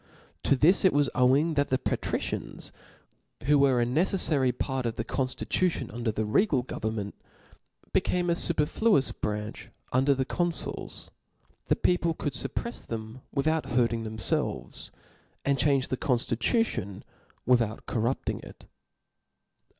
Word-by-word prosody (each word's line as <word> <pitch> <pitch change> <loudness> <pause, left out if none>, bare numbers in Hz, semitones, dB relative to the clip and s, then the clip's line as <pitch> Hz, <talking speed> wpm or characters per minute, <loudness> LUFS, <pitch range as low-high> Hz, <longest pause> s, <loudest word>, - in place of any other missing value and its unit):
To - - +3
this 160 +9 +4
it 190 - +5
was 145 -3 +2
owing 135 +6 +3
that 145 -1 +1
the. 130 - +1
Patricians, - - -3 0.7
who 145 +2 +4
were 130 -4 +4
2l 120 - -3
neceflary 155 -5 +2
part 130 -1 -2
of 115 - -3
the 115 - -2
con 130 +3 -1
llitution 170 +3 -1
under 115 -1 -1
the 110 0 -2
regal 130 - +2
government, 110 -4 -4 0.8
became 180 -1 +1
a 170 - +3
iuperfluous 170 +1 +3
branch 105 +1 -4 0.2
under 135 +2 +4
the 130 0 -1
confuls; 175 +2 -3 0.6
the - - +3
peo 180 - +2
ple 165 -2 -1
cqqld 135 -7 -2
fupprefs 235 - -5
them 110 +2 -6
without 155 +3 0
hurting 120 -2 +1
themr 110 0 -6
felves, 100 - -2 0.6
4nd 140 -1 +2
change 135 -1 +2
the 130 - -1
conftjtution 120 - 0 0.4
without 115 -3 +2
cor? 115 - -2
rupting 120 +4 -1
it. - - -13
130 Hz, 140 wpm, -28 LUFS, 115-155 Hz, 0.8 s, it